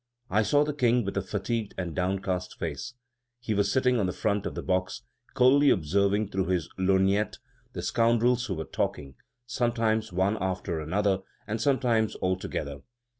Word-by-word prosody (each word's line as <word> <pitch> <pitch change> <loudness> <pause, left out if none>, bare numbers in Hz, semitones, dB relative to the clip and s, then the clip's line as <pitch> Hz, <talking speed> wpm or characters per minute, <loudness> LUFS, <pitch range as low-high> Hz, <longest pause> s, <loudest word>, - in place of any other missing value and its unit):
I 105 +3 +4
saw 145 +7 +3
the 150 0 -2
King 125 -4 +2
with 100 - -3
a 100 - +1
fatigued 105 +3 -3
and 90 -4 -4
downcast 95 0 -2
face; 85 - -5 0.4
he 115 -2 -2
was 100 -1 +1
sitting 125 0 +2
on 100 - +1
the - - -1
front 100 +2 -1
of - - -6
the - - -4
box, 95 +1 -1 0.3
coldly 135 +3 +5
observing 100 +4 +2
through 95 -2 -1
his 90 -5 0
lorgnette 95 +2 +2 0.4
the 90 - -5
scoundrels 120 +5 +2
who 95 - -2
were 80 0 -4
talking, 70 -2 -3 0.3
sometimes 115 -3 0
one 95 +4 +1
after 95 -3 -2
another, 95 +5 0 0.3
and 110 +1 -3
sometimes 120 -5 +2
all 95 0 0
together. 70 -6 -5
100 Hz, 170 wpm, -27 LUFS, 95-115 Hz, 0.4 s, coldly